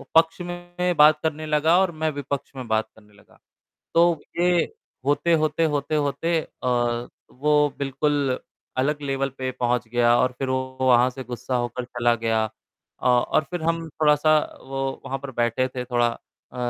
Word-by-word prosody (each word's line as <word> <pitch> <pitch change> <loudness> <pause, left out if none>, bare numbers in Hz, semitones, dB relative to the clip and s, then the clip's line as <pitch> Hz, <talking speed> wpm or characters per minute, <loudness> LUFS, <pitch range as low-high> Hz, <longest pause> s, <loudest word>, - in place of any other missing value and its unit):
पक्ष 165 +2 +4
में 175 0 -3
बात 150 +1 +7
करने 155 0 -2
लगा 155 +3 +3
और 190 - +1
मैं 155 - +3
विपक्ष 140 0 -4
में 130 -3 -6
बात 110 0 +1
करने 105 -1 -21
लगा, 105 - -22 0.6
तो 170 -2 +4 0.2
ये 175 -1 +4 0.4
होते-होते, 155 +2 +2
होते-होते 150 +2 0 0.2
अ, 120 -1 0 0.2
वो 150 +1 +2
बिल्कुल 140 -1 0 0.4
अलग 145 +3 0
लेवल 135 -1 -1
पे 130 0 -2
पहुँच 120 -1 0
गया 120 0 +3
और 125 0 +2
फिर 135 - -2
वो 130 0 -2
वहाँ 125 -1 +5
से 130 +1 -8
गुस्सा 125 +1 -3
होकर 120 +1 -4
चला 120 -1 +1
गया। 115 -1 0 0.5
अ, - - -4
और 125 +5 +3
फिर 175 -2 -4
हम 165 0 -1
थोड़ा-सा 155 0 +3 0.3
वो 135 0 -3
वहाँ 135 +1 -3
पर 140 0 -7
बैठे 120 +2 +1
थे 125 -1 -3
थोड़ा 120 -1 +1 0.5
अ, 125 - -11
135 Hz, 160 wpm, -24 LUFS, 125-155 Hz, 0.6 s, बात